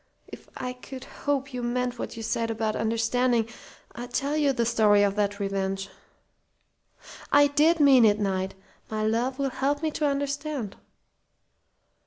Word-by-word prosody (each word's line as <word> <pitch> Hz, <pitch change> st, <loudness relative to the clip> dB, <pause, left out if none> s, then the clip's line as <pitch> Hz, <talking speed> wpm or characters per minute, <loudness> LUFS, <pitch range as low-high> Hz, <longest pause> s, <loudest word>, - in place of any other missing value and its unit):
If -, -, -12 dB
I 250 Hz, 0 st, -4 dB
could 255 Hz, +1 st, -10 dB
hope 275 Hz, -1 st, -3 dB
you 250 Hz, -, -3 dB
meant 245 Hz, 0 st, -2 dB
what -, -, -5 dB
you 225 Hz, -, -5 dB
said 230 Hz, +1 st, -1 dB
about 220 Hz, -1 st, -1 dB
understanding 230 Hz, +1 st, +1 dB, 0.5 s
I'd 245 Hz, +1 st, -8 dB
tell 280 Hz, +3 st, -1 dB
you 295 Hz, -2 st, +3 dB
the 235 Hz, -3 st, 0 dB
story 215 Hz, -3 st, +4 dB
of 200 Hz, -1 st, +1 dB
that 205 Hz, -1 st, -1 dB
revenge." 195 Hz, -1 st, -2 dB, 1.4 s
"I 285 Hz, 0 st, +7 dB
did 305 Hz, +4 st, +3 dB
mean 275 Hz, -4 st, +7 dB
it, 205 Hz, -1 st, +4 dB
Knight. 190 Hz, -1 st, -1 dB, 0.3 s
My 215 Hz, 0 st, -2 dB
love 240 Hz, +4 st, 0 dB
will 275 Hz, -1 st, -1 dB
help 280 Hz, +4 st, -1 dB
me 315 Hz, -, 0 dB
to 300 Hz, 0 st, 0 dB
understand." 280 Hz, -5 st, -3 dB
245 Hz, 155 wpm, -26 LUFS, 215-275 Hz, 1.4 s, I